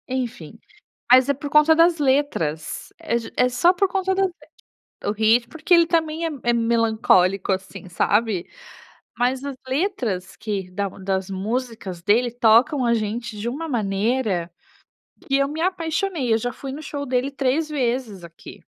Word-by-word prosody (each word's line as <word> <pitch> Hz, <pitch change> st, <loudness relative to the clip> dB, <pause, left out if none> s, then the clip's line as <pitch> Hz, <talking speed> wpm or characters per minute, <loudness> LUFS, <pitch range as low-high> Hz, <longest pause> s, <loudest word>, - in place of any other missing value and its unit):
Enfim, 240 Hz, -, -5 dB, 0.5 s
mas 255 Hz, +1 st, +7 dB
é 280 Hz, -, +3 dB
por 285 Hz, +2 st, -7 dB
conta 300 Hz, +2 st, +6 dB
das 335 Hz, +1 st, +4 dB
letras, 260 Hz, -, -1 dB
é 235 Hz, -, -1 dB
já 230 Hz, -, -8 dB
é 250 Hz, -, +3 dB
só 250 Hz, +9 st, +3 dB
por 380 Hz, +1 st, +1 dB
conta 380 Hz, 0 st, 0 dB
das 385 Hz, 0 st, +1 dB, 0.7 s
é, -, -, -3 dB
o -, -, +2 dB
ritmo, 225 Hz, +3 st, +2 dB
porque 320 Hz, +6 st, +1 dB
ele 340 Hz, -1 st, +6 dB
também 325 Hz, -1 st, 0 dB
é -, -, -2 dB
é 240 Hz, -, +2 dB
melancólico 220 Hz, -5 st, +2 dB
assim 190 Hz, 0 st, -5 dB
sabe, 200 Hz, +2 st, 0 dB, 0.7 s
mas 255 Hz, +2 st, 0 dB
as 280 Hz, -1 st, -5 dB
letras 255 Hz, -, -2 dB
que 195 Hz, -4 st, -4 dB
da 200 Hz, +2 st, -2 dB
das 190 Hz, 0 st, -3 dB
músicas 205 Hz, -2 st, -4 dB
dele 225 Hz, +6 st, +2 dB
tocam 245 Hz, +3 st, +3 dB
a 235 Hz, -, +3 dB
gente 225 Hz, 0 st, -3 dB
de 210 Hz, +3 st, -4 dB
uma 310 Hz, +7 st, -5 dB
maneira, 210 Hz, -, -1 dB, 0.8 s
que 275 Hz, -, +1 dB
eu 275 Hz, 0 st, +2 dB
me 305 Hz, +3 st, -5 dB
apaixonei, 330 Hz, -, -1 dB
eu -, -, +4 dB
já 245 Hz, +2 st, -3 dB
fui 275 Hz, -, -7 dB
no 285 Hz, +3 st, -7 dB
show 285 Hz, -1 st, -5 dB
dele 255 Hz, +1 st, -1 dB
3 275 Hz, +3 st, 0 dB
vezes 245 Hz, -, -2 dB
aqui. 170 Hz, 0 st, -13 dB
245 Hz, 165 wpm, -22 LUFS, 205-290 Hz, 0.8 s, mas